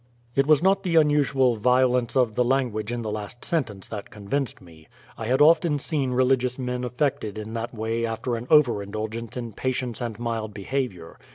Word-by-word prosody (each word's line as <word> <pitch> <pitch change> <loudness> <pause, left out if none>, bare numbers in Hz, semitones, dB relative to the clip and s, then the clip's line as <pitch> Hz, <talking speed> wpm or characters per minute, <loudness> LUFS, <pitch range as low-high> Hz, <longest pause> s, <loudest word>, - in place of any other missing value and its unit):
It 135 +1 +3
was 155 +1 +5
not 195 +1 +4
the 180 -4 -1
unusual 145 -5 +3
violence 125 +1 +2
of 125 -4 +3
the 125 - +2
language 120 -4 0
in 120 -1 -3
the 110 - -3
last 105 +3 -6
sentence 120 - -2
that 105 -2 -6
convinced 115 +6 -3
me. 80 -4 -17 0.3
I 110 - -5
had 130 +3 +2
often 160 -1 +4
seen 140 -2 -1
religious 125 0 +2
men 125 -1 -3
affected 125 -3 -1
in 110 +1 -6
that 115 +1 -3
way 115 0 -2
after 115 +2 -2
an 115 +2 -6
over 125 -9 +5
indulgence 110 +4 -5
in 120 -3 -5
patience 125 0 -3
and 115 -3 -4
mild 115 -3 -3
behavior. 100 -5 -4
120 Hz, 185 wpm, -25 LUFS, 110-135 Hz, 0.3 s, was